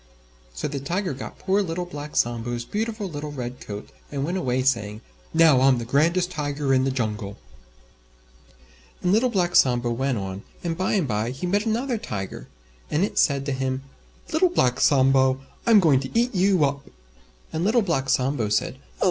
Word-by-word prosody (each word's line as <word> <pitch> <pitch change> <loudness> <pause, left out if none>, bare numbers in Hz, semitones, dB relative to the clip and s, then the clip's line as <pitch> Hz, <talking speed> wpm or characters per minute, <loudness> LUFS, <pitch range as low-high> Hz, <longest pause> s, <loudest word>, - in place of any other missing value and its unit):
So - - -2
the 140 -1 -4
Tiger 175 +5 -2
got 130 - -8
poor 195 +2 +1
Little 175 -1 -3
Black 150 -3 -8
Sambo's 120 0 -1
beautiful 215 - -3
little 150 -3 -6
Red 125 -3 -6
Coat, 105 0 -8 0.2
and 140 -2 -2
went 175 +4 -2
away 130 -5 0
saying, 110 -5 0 0.3
"Now 160 -5 +5
I'm 135 -1 +5
the 120 - -4
grandest 170 +8 +2
Tiger 145 -3 -1
in 130 0 +3
the - - +1
Jungle." 105 -5 -3 1.7
And 180 - +2
Little 230 +5 +3
Black 180 -6 0
Sambo 120 -2 +4
went 130 +1 -1
on, 95 -1 -5 0.2
and 170 -2 -1
by 185 +2 -1
and 185 -8 +1
by 110 0 -1
he 135 +8 -5
met 205 +5 0
another 235 +2 0
Tiger, 95 - -6 0.4
and 155 +5 +1
it 205 - 0
said 140 -2 +2
to 140 - -2
him, 130 0 -2 0.5
"Little 355 +3 +4
Black 125 - +1
Sambo, 130 -1 +4 0.3
I'm 225 -3 +7
going 155 -8 +4
to 135 - -1
eat 240 +1 +1
you 185 -4 +3
up!" 140 0 -2 0.7
And 160 - -1
Little 225 +4 +3
Black 135 -8 -1
Sambo 125 -4 +1
said, 105 - 0
"Oh! - - -28
140 Hz, 180 wpm, -24 LUFS, 125-180 Hz, 1.7 s, I'm